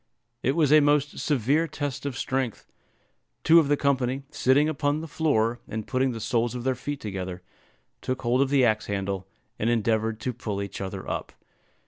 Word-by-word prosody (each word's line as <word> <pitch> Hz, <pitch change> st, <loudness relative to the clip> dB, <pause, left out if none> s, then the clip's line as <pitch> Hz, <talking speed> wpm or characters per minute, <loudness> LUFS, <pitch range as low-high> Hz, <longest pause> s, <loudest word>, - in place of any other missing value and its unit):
It 135 Hz, +3 st, +1 dB
was 155 Hz, -4 st, +3 dB
a 155 Hz, -, +9 dB
most 145 Hz, 0 st, +2 dB
severe 145 Hz, +4 st, +1 dB
test 145 Hz, -1 st, -4 dB
of 135 Hz, -3 st, -4 dB
strength. 130 Hz, -4 st, -2 dB, 0.8 s
Two 165 Hz, +1 st, +7 dB
of 155 Hz, -, +2 dB
the 145 Hz, 0 st, +2 dB
company, 135 Hz, -1 st, 0 dB
sitting 145 Hz, +1 st, +3 dB
upon 145 Hz, -1 st, 0 dB
the 165 Hz, -, -6 dB
floor, 120 Hz, -8 st, +1 dB
and 110 Hz, -1 st, -4 dB
putting 130 Hz, 0 st, +1 dB
the 115 Hz, -, -5 dB
soles 120 Hz, +2 st, 0 dB
of 120 Hz, -, -4 dB
their 130 Hz, +1 st, +1 dB
feet 140 Hz, +3 st, -5 dB
together, 95 Hz, -3 st, -5 dB, 0.6 s
took 130 Hz, 0 st, -3 dB
hold 125 Hz, +2 st, +2 dB
of 140 Hz, -, +2 dB
the 135 Hz, -2 st, +4 dB
axe 110 Hz, -2 st, +1 dB
handle, 95 Hz, -1 st, -3 dB, 0.3 s
and 110 Hz, -, +1 dB
endeavored 110 Hz, -1 st, +1 dB
to 125 Hz, -, -2 dB
pull 110 Hz, -4 st, -4 dB
each 100 Hz, -1 st, -5 dB
other 95 Hz, 0 st, -5 dB
up. -, -, -4 dB
130 Hz, 185 wpm, -26 LUFS, 110-145 Hz, 0.8 s, a